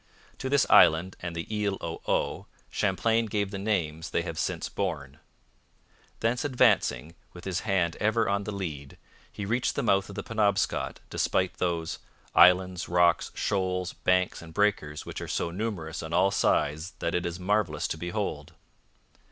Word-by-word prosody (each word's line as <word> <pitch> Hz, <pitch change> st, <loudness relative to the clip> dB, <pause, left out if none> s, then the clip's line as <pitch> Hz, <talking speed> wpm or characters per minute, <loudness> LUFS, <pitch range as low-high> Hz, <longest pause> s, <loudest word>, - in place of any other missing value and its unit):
To 130 Hz, -, -3 dB
this 140 Hz, -1 st, +4 dB
island 85 Hz, +4 st, +5 dB
and 85 Hz, -1 st, -5 dB
the 85 Hz, -, -4 dB, 0.2 s
Isle 100 Hz, -1 st, 0 dB
au 80 Hz, 0 st, -5 dB
Haut -, -, -1 dB, 0.2 s
Champlain 115 Hz, 0 st, +1 dB
gave 100 Hz, -2 st, -1 dB
the 100 Hz, -, -4 dB
names 85 Hz, -6 st, -1 dB
they -, -, 0 dB
have -, -, -5 dB
since -, -, -2 dB
borne. -, -, -4 dB, 1.0 s
Thence 115 Hz, +2 st, +1 dB
advancing, 125 Hz, -, +2 dB, 0.2 s
with 90 Hz, -, -11 dB
his 95 Hz, -2 st, -1 dB
hand 90 Hz, -5 st, 0 dB
ever 110 Hz, +2 st, +1 dB
on 100 Hz, 0 st, 0 dB
the 105 Hz, -, -3 dB
lead, 80 Hz, -9 st, -6 dB, 0.3 s
he 100 Hz, -, -5 dB
reached 120 Hz, +5 st, 0 dB
the -, -, -1 dB
mouth 95 Hz, -4 st, +2 dB
of 100 Hz, -, -8 dB
the 105 Hz, -, -4 dB
Penobscot, 105 Hz, -3 st, 0 dB
despite 95 Hz, -1 st, 0 dB
those 85 Hz, -2 st, -2 dB, 0.3 s
'islands, 90 Hz, 0 st, +5 dB
rocks, 90 Hz, 0 st, +3 dB
shoals, 90 Hz, -2 st, -1 dB
banks, 90 Hz, 0 st, +1 dB
and 80 Hz, -1 st, -12 dB
breakers 100 Hz, -8 st, 0 dB
which -, -, -6 dB
are -, -, -5 dB
so 85 Hz, -, -2 dB
numerous 90 Hz, -5 st, -4 dB
on 80 Hz, +1 st, -6 dB
all 95 Hz, +3 st, +4 dB
sides 80 Hz, -2 st, +1 dB
that 85 Hz, -, -2 dB
it 90 Hz, -, 0 dB
is 85 Hz, 0 st, -4 dB
marvellous 105 Hz, +3 st, 0 dB
to -, -, -2 dB
behold.' 85 Hz, +2 st, -4 dB
95 Hz, 165 wpm, -28 LUFS, 85-105 Hz, 1.0 s, island